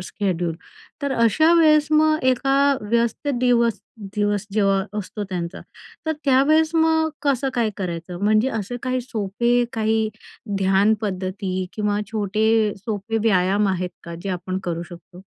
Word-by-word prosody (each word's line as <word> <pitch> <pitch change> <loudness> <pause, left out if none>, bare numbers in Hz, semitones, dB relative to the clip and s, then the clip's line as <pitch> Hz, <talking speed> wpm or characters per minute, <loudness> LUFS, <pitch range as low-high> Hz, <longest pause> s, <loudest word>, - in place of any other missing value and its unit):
Schedule. 180 -4 -2 0.5
तर 280 -1 0
अशा 265 +9 +3
वेळेस 305 -2 +5
मग 310 0 +4
एका 270 +2 0 0.2
व्यस्त 235 +5 -1
दिवस 235 -3 +2 0.4
दिवस 205 -1 0
जेव्हा 195 -2 +2
असतो 205 +1 -5
त्यांचा, 175 -1 -4 0.5
तर 315 - +1
त्यावेळेस 310 +4 +3
मग 320 0 +3
कसं 275 -2 +1
काय 235 -3 +1
करायचं? 175 -1 -5
म्हणजे 215 +4 +3
असे 215 +4 -4
काही 255 0 -1
सोपे, 235 +1 0
काही 220 0 +1 0.5
ध्यान 195 +3 +3
पद्धती 190 -2 -3 0.2
किंवा 210 -1 -1
छोटे 215 +1 +1 0.3
सोपे 210 +2 -3
व्यायाम 195 +1 +2
आहेत 180 -1 -2
का, 170 - -7
जे 200 - -4
आपण 185 +1 -4
करू 170 -1 -3
शकतो? 175 +1 -13
215 Hz, 135 wpm, -22 LUFS, 190-255 Hz, 0.5 s, वेळेस